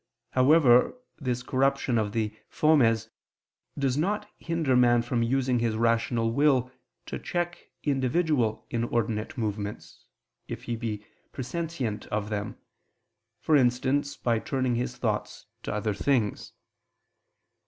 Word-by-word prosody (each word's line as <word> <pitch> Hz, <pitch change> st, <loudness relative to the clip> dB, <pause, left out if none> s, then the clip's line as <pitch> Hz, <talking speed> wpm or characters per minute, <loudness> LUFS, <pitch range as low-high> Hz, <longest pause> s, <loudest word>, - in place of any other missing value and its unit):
However, 130 Hz, -, +5 dB, 0.2 s
this 125 Hz, -3 st, -2 dB
corruption 135 Hz, -2 st, +1 dB
of 105 Hz, -2 st, -1 dB
the 110 Hz, -1 st, -2 dB
fomes 125 Hz, -9 st, +3 dB, 0.7 s
does 135 Hz, -2 st, 0 dB
not 205 Hz, +6 st, 0 dB
hinder 165 Hz, -6 st, 0 dB
man 120 Hz, -1 st, +5 dB
from 120 Hz, 0 st, -1 dB
using 125 Hz, +1 st, +1 dB
his 115 Hz, -2 st, 0 dB
rational 115 Hz, 0 st, +1 dB
will 130 Hz, -3 st, +3 dB, 0.3 s
to -, -, -5 dB
check 175 Hz, 0 st, -3 dB
individual 135 Hz, -4 st, +1 dB
inordinate 115 Hz, +3 st, -1 dB
movements, 105 Hz, -2 st, -4 dB, 0.4 s
if -, -, -6 dB
he 120 Hz, -, -3 dB
be 110 Hz, -3 st, -4 dB, 0.3 s
presentient 130 Hz, -5 st, -3 dB
of 105 Hz, 0 st, -3 dB
them, 105 Hz, -1 st, -3 dB, 0.8 s
for 155 Hz, -, +3 dB
instance 135 Hz, +2 st, +2 dB
by 115 Hz, -2 st, +1 dB
turning 130 Hz, 0 st, -1 dB
his 125 Hz, +1 st, -2 dB
thoughts 110 Hz, -4 st, -2 dB, 0.2 s
to -, -, -4 dB
other 105 Hz, 0 st, -1 dB
things. 110 Hz, 0 st, 0 dB
125 Hz, 120 wpm, -27 LUFS, 115-140 Hz, 0.8 s, However